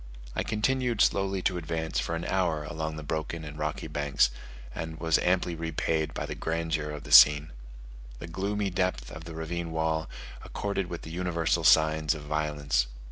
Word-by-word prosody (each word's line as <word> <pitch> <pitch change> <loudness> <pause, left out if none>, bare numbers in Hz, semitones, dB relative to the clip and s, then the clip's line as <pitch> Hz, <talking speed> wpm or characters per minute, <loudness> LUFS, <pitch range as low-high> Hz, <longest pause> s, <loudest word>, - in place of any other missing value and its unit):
I - - 0
continued 120 +1 0
slowly 95 -2 +2
to 90 -2 +1
advance 80 -1 -2
for 85 - -2
an 85 +1 -4
hour 85 -5 0
along 80 +1 -4
the 75 - -7
broken 80 +2 -3
and 75 -1 -8
rocky 75 0 -3
banks, 70 -4 +1 0.4
and 80 0 -6
was 80 -1 +2
amply 90 -1 +1
repaid 80 -1 -1
by - - -2
the - - -5
grandeur 80 -2 -2
of 75 -1 -6
the - - -10
scene. 75 +1 +8 0.7
The - - -7
gloomy 100 +4 -2
depth 90 -10 -1
of 80 +1 -9
the 85 -1 -8
ravine 85 +1 -4
well 80 0 -1 0.3
accorded 100 -2 -3
with 85 -1 -6
the 80 - -8
universal 85 -1 0
signs 80 -1 +4
of 75 - -8
violence. 75 -4 0
80 Hz, 175 wpm, -28 LUFS, 75-90 Hz, 0.7 s, scene